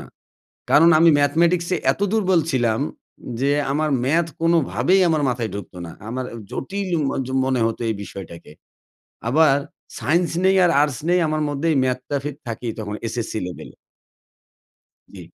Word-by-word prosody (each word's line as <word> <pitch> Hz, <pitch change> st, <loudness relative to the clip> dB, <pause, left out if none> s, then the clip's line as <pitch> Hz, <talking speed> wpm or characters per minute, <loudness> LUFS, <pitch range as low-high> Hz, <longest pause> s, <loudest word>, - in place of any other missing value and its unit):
না। -, -, -9 dB, 0.7 s
কারণ 165 Hz, +3 st, +6 dB
আমি 165 Hz, 0 st, +6 dB
ম্যাথমেটিক্সে 170 Hz, +5 st, +2 dB, 0.2 s
এত -, -, -13 dB
দুর্বল 190 Hz, -6 st, +3 dB
ছিলাম, 120 Hz, -4 st, +1 dB, 0.6 s
যে 140 Hz, -, +2 dB, 0.2 s
আমার 155 Hz, +1 st, 0 dB
ম্যাথ 160 Hz, +5 st, +2 dB
কোনোভাবেই 165 Hz, +1 st, +2 dB
আমার 155 Hz, -2 st, +1 dB
মাথায় 120 Hz, -3 st, -2 dB
ঢুকতো 100 Hz, -2 st, -8 dB
না। 85 Hz, -, -9 dB, 0.2 s
আমার 130 Hz, +2 st, -3 dB
আ -, -, -6 dB
জটিল 195 Hz, +6 st, -4 dB, 0.2 s
ম -, -, -1 dB, 0.2 s
য -, -, -8 dB, 0.2 s
মনে 130 Hz, -2 st, 0 dB
হত 115 Hz, -, -3 dB
এই 110 Hz, -, 0 dB
বিষয়টাকে। 85 Hz, -6 st, -10 dB, 0.8 s
আবার 145 Hz, +1 st, +4 dB, 0.4 s
সায়েন্স 170 Hz, +3 st, +1 dB
নেই 190 Hz, 0 st, +4 dB
আর 175 Hz, -, +4 dB
আর্টস 145 Hz, -4 st, -1 dB
নেই, 180 Hz, +1 st, +4 dB
আমার 155 Hz, 0 st, -1 dB
মধ্যেই 145 Hz, +2 st, 0 dB
ম্যাথটা 130 Hz, +2 st, -2 dB
ফেদ 150 Hz, -2 st, -4 dB
থাকেই 115 Hz, 0 st, -4 dB
তখন 105 Hz, -1 st, -5 dB
এসএসসি 115 Hz, -1 st, -3 dB
লেভেলে। 90 Hz, -, -9 dB, 1.4 s
জি। -, -, -9 dB
145 Hz, 155 wpm, -21 LUFS, 120-170 Hz, 1.4 s, কারণ